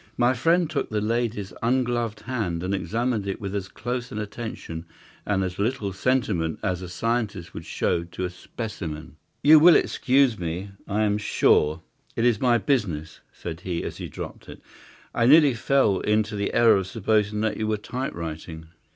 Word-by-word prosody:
My 120 +1 +4
friend 165 +7 +2
took 155 -2 -2
the 110 - -1
lady's 110 -2 -1
ungloved 120 -3 0
hand 105 -9 -2
and 95 +2 -1
examined 115 +1 -1
it 95 - -3
with 100 -2 -5
as 100 -2 -3
close 125 +4 -4
an - - -5
attention 105 -6 -6 0.4
and 95 -2 +1
as 90 0 -4
little 105 -2 -1
sentiment 100 -8 0
as 90 -1 -1
a 90 - -7
scientist 110 -2 -2
would - - -8
show 85 - 0
to 90 +2 -5
a 90 - -4
specimen. 85 - -7 0.3
"You 155 +2 +9
will 170 +2 +8
excuse 130 -4 +3
me, 90 +4 -4 0.2
I 105 +2 +1
am 105 0 +1
sure. 80 -5 +2 0.3
It 115 - +1
is 120 -4 +3
my 120 -2 +4
business," 90 - -1
said 80 -1 -7
he, 90 -2 -3
as - - -5
he - - -5
dropped - - -8
it. - - -10 0.5
"I 115 -1 +2
nearly 145 -1 +7
fell 115 -4 +2
into 105 0 +1
the 100 0 -1
error 115 -3 +5
of 95 -1 -2
supposing 105 +1 0
that 110 -1 0
you 110 - -1
were 110 0 +1
typewriting. 85 - -6
105 Hz, 175 wpm, -25 LUFS, 90-120 Hz, 0.5 s, You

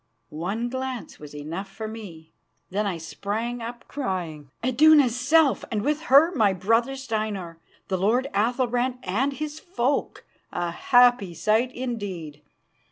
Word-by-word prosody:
One 195 +10 -2
glance 260 -5 -5
was 150 -1 -11
enough 165 +7 -5
for 215 +3 -6
me. 180 -8 -9 0.4
Then 205 +2 0
I 185 -4 -2
sprang 220 +8 -4
up, 235 +1 -7
crying: 175 - -4 0.2
"Iduna's 275 -1 +5
self, 280 +3 +3
and 215 -3 -1
with 300 +3 0
her 300 +7 +7
my 215 - +3
brother 230 +8 +1
Steinar, 215 -9 -4 0.3
the 190 -2 -1
lord 235 +8 +2
Athalbrand 245 +3 +1
and 255 +10 0
his 305 +1 -5
folk. 285 -7 -2 0.3
A 175 -1 -2
happy 245 -2 +4
sight 215 +9 +2
indeed!" 195 - -5
225 Hz, 135 wpm, -25 LUFS, 185-255 Hz, 0.4 s, her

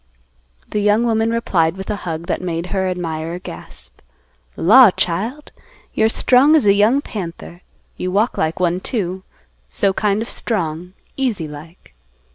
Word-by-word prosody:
The 210 - 0
young 210 +3 +3
woman 225 -1 +1
replied 185 -7 0
with 190 +2 -5
a - - -1
hug 160 +1 -4
that - - -2
made 175 0 -4
her 190 -1 0
admirer 165 -2 -4
gasp. 180 - -12 0.6
"Law, 230 +6 +7
child; 215 - -3 0.4
you're 220 0 +2
strong 260 +6 +4
as 300 - +3
a 200 - +6
young 215 +7 +3
panther. 175 -6 -8 0.4
You 185 - -3
walk 210 +6 +1
like 160 +2 -1
one 180 0 +1
too; 190 -3 -3 0.5
so 195 - 0
kind 210 +2 0
of - - -9
strong, 180 -7 -3 0.2
easy 230 - -1
like." 150 - -13
190 Hz, 150 wpm, -19 LUFS, 170-225 Hz, 0.6 s, Law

